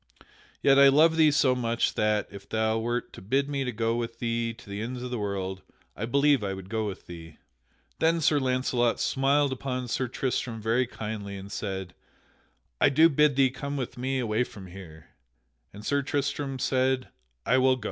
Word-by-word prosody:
Yet 140 0 +6
I 140 - +9
love 155 +4 +5
thee 160 -1 +5
so 135 -3 +3
much 115 -2 0
that, 105 -1 +1
if 100 - -11
thou 110 0 +1
wert 120 +2 -3
to - - -10
bid 135 +9 0
me 135 -3 -2
go 115 0 -1
with 115 -1 -4
thee 115 0 -1
to 115 - -14
the 100 +1 -5
ends 125 +2 -5
of 125 - -5
the 120 - -2
world, 95 -2 -3 0.3
I 105 - -3
believe 140 -1 +3
I 95 -1 -2
would 95 +1 -10
go 110 -1 -1
with 95 - -7
thee." 80 -2 -11 0.6
Then 165 +1 +3
Sir 150 -2 +3
Launcelot 125 -2 +1
smiled 140 +1 +2
upon 130 -1 -4
Sir 125 +2 -1
Tristram 120 -2 -2
very 115 +3 +1
kindly 105 -4 -6
and 100 +1 -9
said, 95 -4 -4 0.9
"I - - +5
do 160 +4 +5
bid 150 -2 +3
thee 135 -1 +4
come 140 +2 -5
with 130 -3 -4
me 130 +2 -2
away 115 -1 0
from 100 -5 -10
here," 85 -4 -12 0.6
and 105 +2 -11
Sir 140 0 +1
Tristram 140 -1 -2
said, 130 0 0 0.4
"I 130 - +3
will 130 0 +4
go." - - -10
125 Hz, 190 wpm, -27 LUFS, 105-135 Hz, 0.9 s, I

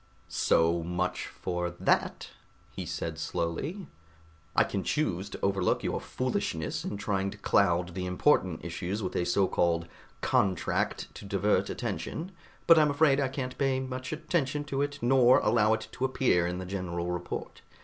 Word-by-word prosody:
"So 85 +1 +2
much 90 +2 -2
for 90 -1 -3
that," - - +1 0.4
he - - -6
said 80 -1 -4
slowly. 85 - -3 0.7
"I - - +6
can 100 - -2
choose 100 - -1
to - - -7
overlook 100 -2 +1
your - - -1
foolishness - - -2
in 100 - -4
trying 100 -1 -1
to 105 - -9
cloud 90 -4 +2
the 90 0 -3
important 90 - +2
issues 90 +4 -3
with 90 - -3
a 90 - +1
so 95 +2 +3
called 85 -2 +1 0.3
'contract' 95 -4 0
to - - -10
divert 100 +1 +1
attention, 175 +4 -4 0.3
but 165 -1 +8
I'm 150 -1 +4
afraid 145 -1 +4
I 140 - +2
can't 130 -1 -4
pay 135 -1 +2
much 130 -1 -5
attention 150 -2 -1
to 140 -1 -2
it, 145 0 -1
nor 125 0 +6
allow 110 0 +3
it 110 - -2
to 130 - -2
appear 130 -10 +2
in 90 0 -3
the 95 - -5
general 90 -2 -3
report. 90 0 -5
100 Hz, 160 wpm, -29 LUFS, 90-130 Hz, 0.7 s, but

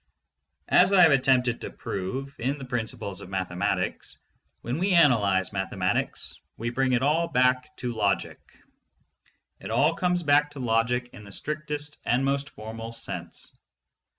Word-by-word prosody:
As 185 - +6
I 190 - +7
have 165 - +7
attempted 130 -3 +3
to - - -5
prove 130 +9 -5
in 135 +5 -1
The 135 - -8
Principles 110 -6 -3
of - - -10
Mathematics, 90 -2 -2 0.4
when 125 +6 -3
we 190 +2 +2
analyze 105 - +4
mathematics 95 -1 -2 0.2
we 120 +1 -3
bring 130 +1 +1
it 125 +1 +2
all 160 +4 +2
back 125 -1 +1
to 125 -1 -3
logic. 100 -5 0 1.2
It - - -8
all - - +3
comes 180 -1 0
back 145 0 +4
to 145 - -9
logic 125 +1 0
in 105 - -11
the 100 - -12
strictest 150 +3 -4
and 125 +3 +1
most 140 0 0
formal 115 +1 -8
sense. 115 - -5
125 Hz, 150 wpm, -26 LUFS, 115-145 Hz, 1.2 s, I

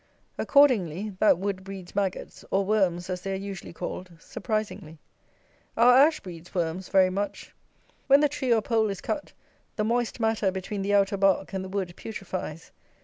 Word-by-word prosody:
Accordingly, 215 - +3
that 215 - +5
wood 190 0 -3
breeds 190 -2 -9
maggots, 195 -2 -3
or 195 0 +1
worms 190 -4 +1
as 180 -1 -4
they 195 +1 -3
are - - -1
usually 195 -1 -6
called, 180 +2 -6
surprisingly. 210 -5 -4 0.8
Our 245 +2 +7
ash 300 +4 +5
breeds 175 -1 -11
worms 175 +1 -2
very 190 -1 +4
much. 200 +2 -4 0.5
When 275 +1 +6
the 295 - +5
tree 275 -3 -2
or 225 -2 +3
pole 220 -1 +1
is 195 - -4
cut, 295 - -4 0.4
the 215 - 0
moist 240 +2 -1
matter 220 -3 +1
between 190 +2 -4
the 200 +1 +1
outer 200 0 +2
bark 195 0 +2
and 190 -1 -2
the 190 - -7
wood 190 -3 -3
putrifies. 190 -7 -6
195 Hz, 170 wpm, -26 LUFS, 185-220 Hz, 0.8 s, Our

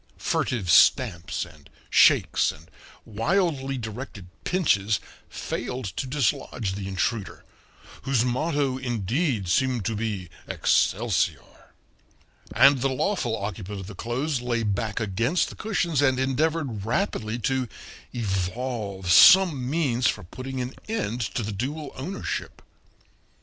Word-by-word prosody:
Furtive 100 -9 -1
stamps 85 +1 +3
and 75 -4 -17 0.2
shakes - - +5
and 80 +2 -16 0.3
wildly 135 - 0
directed 110 -3 -7 0.2
pinches 110 - +1 0.3
failed 125 -1 -4
to 100 +7 -4
dislodge 125 -6 -1
the 100 0 -5
intruder, 95 +2 -2 0.6
whose 130 -3 +1
motto, 135 +1 0
indeed, 120 - -1
seemed 125 +3 +1
to 110 - -1
be 105 -4 -3 0.2
Excelsior; 90 - 0 0.8
and 140 -2 +6
the 135 - +2
lawful 130 - -1
occupant 100 0 -5
of 95 - -7
the 105 - -9
clothes 125 - -2
lay 120 -2 -1
back 105 0 -1
against 115 - 0
the - - -10
cushions 175 -8 0
and 130 -2 +3
endeavored 135 -4 0
rapidly 115 - -1
to 130 +2 -1 0.4
evolve 100 -2 -2
some 155 - +7
means 135 -6 +1
for - - -1
putting 130 +9 -6
an 125 +1 -3 0.2
end 125 - -2
to 115 +1 -2
the 105 - -3
dual 140 +8 -4
ownership. 170 +10 -5
120 Hz, 120 wpm, -25 LUFS, 100-135 Hz, 0.8 s, some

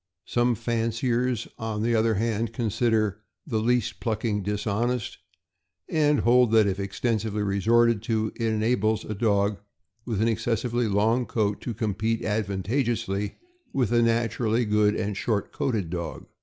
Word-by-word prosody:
Some 120 0 +1
fanciers, 115 +1 -1
on 110 -1 -3
the 120 +1 +1
other 110 0 +2
hand, 115 +1 -1
consider 110 -3 0 0.2
the 115 -8 -1
least 120 0 0
plucking 110 -2 -1
dishonest, 110 +4 -2 0.7
and 150 -2 +2
hold 120 -1 +4
that, 110 -1 +6
if 100 -1 -1
extensively 105 +1 -1
resorted 110 +3 +3
to, 110 -1 +1
it 115 - -1
enables 110 0 +1
a 110 - -4
dog 100 -1 +1 0.4
with 115 -5 -3
an 110 - +2
excess 115 0 0
ively 120 -3 0
long 115 +5 +2
coat 105 -2 -1
to 120 - -4
compete 110 +2 -1
advantageously 105 0 -1 0.4
with 125 -5 +1
a 120 - +4
naturally 115 0 +1
good 105 0 +3
and 105 -2 -2
short 105 -3 -1
coated 115 - -2
dog. 85 -3 -5
110 Hz, 140 wpm, -26 LUFS, 105-120 Hz, 0.7 s, that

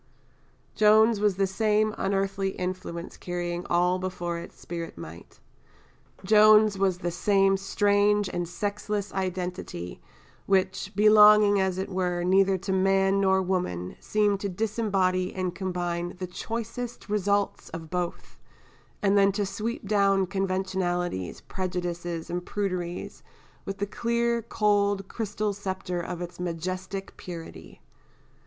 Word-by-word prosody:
Joan's 215 +1 +5
was 205 -2 +2
the 195 +1 +2
same 215 +2 +1
unearthly 195 0 -1
influence 180 -1 -5
carrying 175 0 -4
all 180 +1 +2
before 175 -2 -3
its - - -11
spirit 170 - -6
might 85 0 -11 0.9
Joan's 215 0 +6
was 190 -2 +1
the 175 -1 -3
same 195 +2 +3
strange 205 +1 +2
and 175 -2 -3
sexless 205 +2 -3
identity, 180 - -4 0.5
which, 190 0 +1
belonging 210 -1 +7
as 190 -1 0
it 190 - -2
were 180 -2 -1
neither 190 +1 +4
to 190 +2 -4
man 195 +1 +3
nor 190 -1 +3
woman, 175 - -2
seemed 205 -2 +1
to 200 - -3
disembody 195 -3 0
and 185 -2 -2
combine 175 -2 -3
the 185 - -4
choicest 230 +5 -5
results 205 -1 0
of 165 -1 -8
both, 180 -1 -4 0.6
and 200 0 +3
then 200 0 +5
to 205 0 0
sweep 230 - -4
down 195 -2 +3
conventionalities, 185 - -2
prejudices, 175 -2 -4
and 175 +1 -3
pruderies, 180 -4 -3 0.4
with 195 0 -4
the 205 - -1
clear, 235 +2 0
cold, 205 -3 +1
crystal 210 -1 -2
sceptre 190 -2 -4
of 175 +1 -5
its 175 +1 -9
majestic 185 +3 -4
purity. 170 -2 -10
190 Hz, 125 wpm, -27 LUFS, 180-205 Hz, 0.9 s, belonging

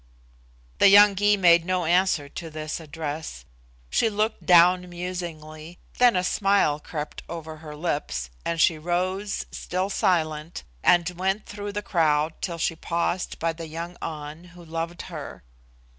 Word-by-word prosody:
The - - +7
young 205 0 +8
Gy 205 +1 +3
made 170 -3 +5
no 185 0 -1
answer 175 -3 +2
to 165 +3 -8
this 155 0 -5
address. 155 - -6 0.5
She 225 - +3
looked 215 +1 -2
down 180 +1 +6
musingly, 175 -2 -7 0.2
then 245 -3 +6
a 180 - +1
smile 195 -6 +2
crept 150 -1 -6
over 160 -2 -7
her 155 -1 -10
lips, 145 - -3
and 170 0 -2
she 160 -1 +4
rose, 185 +5 -2
still 185 +2 -3
silent, 155 -3 0 0.2
and 175 -2 +4
went 190 +4 -2
through 205 0 -6
the 205 0 -3
crowd 155 -4 +1
till 170 -2 -3
she 165 0 -1
paused 170 +2 -2
by 165 0 -1
the 165 0 -8
young 170 +3 -6
An 155 +1 -6
who 175 - -12
loved 165 +1 -4
her. - - -8
170 Hz, 150 wpm, -25 LUFS, 155-185 Hz, 0.5 s, young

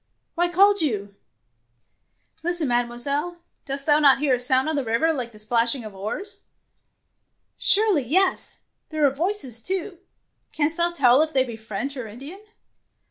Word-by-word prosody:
Why 350 +1 0
called 395 +2 +4
you? 205 -9 -2 0.7
" - - -42
Listen, 345 -3 0
Mademoiselle! 245 +8 -2 0.3
Dost 275 0 -5
thou 295 -1 +4
not 280 -3 +6
hear 275 -1 +1
a 250 - +1
sound 260 +3 +1
on 315 - -1
the 280 - -1
river 240 +8 +1
like 250 -5 -5
the 215 - -16
splashing 230 +3 0
of 215 - -9
oars? 215 - -6 0.4
" - - -51
'' - - -51
Surely 410 -6 +4
yes; 370 +10 0 0.3
there 310 -2 +1
are 275 - +4
voices 275 - -2
too. 370 - -2 0.5
Canst 310 +1 -1
thou 345 0 +2
tell 275 -5 +4
if 315 0 -1
they 260 - +3
be 240 -3 -7
French 220 +5 -5
or 250 -4 -6
Indian? 275 - -10
280 Hz, 170 wpm, -23 LUFS, 240-340 Hz, 0.7 s, not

